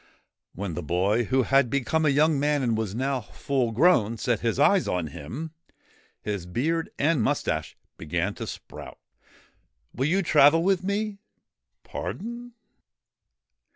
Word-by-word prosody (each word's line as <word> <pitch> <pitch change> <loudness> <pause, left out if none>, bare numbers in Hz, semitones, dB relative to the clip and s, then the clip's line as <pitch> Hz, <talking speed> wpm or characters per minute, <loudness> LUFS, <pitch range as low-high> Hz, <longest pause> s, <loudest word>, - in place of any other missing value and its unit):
When 95 -1 -4
the 90 - -4
boy, 95 +9 +1
who 130 +3 +2
had 135 -1 +3
become 140 +5 +1
a - - +5
young 150 +1 +3
man 145 -1 +1
and 115 -3 +1
was 110 -2 -3
now 130 +1 -1
full 125 +1 -2
grown, 115 - +3
set 115 0 0
his 115 0 -1
eyes 185 +6 +4
on 90 -2 -1
him, 135 - -7 0.7
his 100 -4 -4
beard 160 - -1
and 150 -2 +2
moustache - - -1 0.2
began - - -2
to - - -7
sprout. - - -9 0.5
' - - -43
Will 130 +4 0
you 190 +5 +2
travel 155 0 +5
with 190 -1 +2
me? 200 +1 -2 0.2
' - - -62
' - - -57
Pardon 235 +3 -6
135 Hz, 155 wpm, -26 LUFS, 110-165 Hz, 0.7 s, a